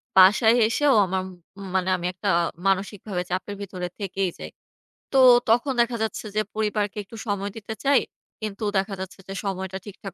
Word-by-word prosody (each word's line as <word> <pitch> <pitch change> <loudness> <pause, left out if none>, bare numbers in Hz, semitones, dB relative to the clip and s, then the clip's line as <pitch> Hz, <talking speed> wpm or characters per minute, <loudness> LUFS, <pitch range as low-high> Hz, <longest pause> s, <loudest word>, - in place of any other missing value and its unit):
বাসায় 215 +5 +7
এসেও 285 +4 +3
আমার 185 0 -1 0.5
মানে 185 0 +1
আমি 175 - -6
একটা 200 +2 -3 0.4
মানসিকভাবে 195 -1 -1
চাপের 195 +2 -3
ভিতরে 180 -2 -5
থেকেই 195 -1 -1
যাই। - - -7 0.6
তো 270 - +5 0.3
তখন 245 +4 +3
দেখা 235 0 0
যাচ্ছে, 220 0 -3
যে 215 - +3
পরিবারকে 210 -1 -1
একটু 225 - -13
সময় 200 0 -2
দিতে 220 +1 -6
চাই। 280 +1 +4 0.4
কিন্তু 215 0 -5
দেখা 195 +1 0
যাচ্ছে, 190 +1 -7
যে 195 - -5
সময়টা 190 -1 -3
ঠিকঠাক 200 -1 -9
200 Hz, 160 wpm, -24 LUFS, 190-220 Hz, 0.6 s, বাসায়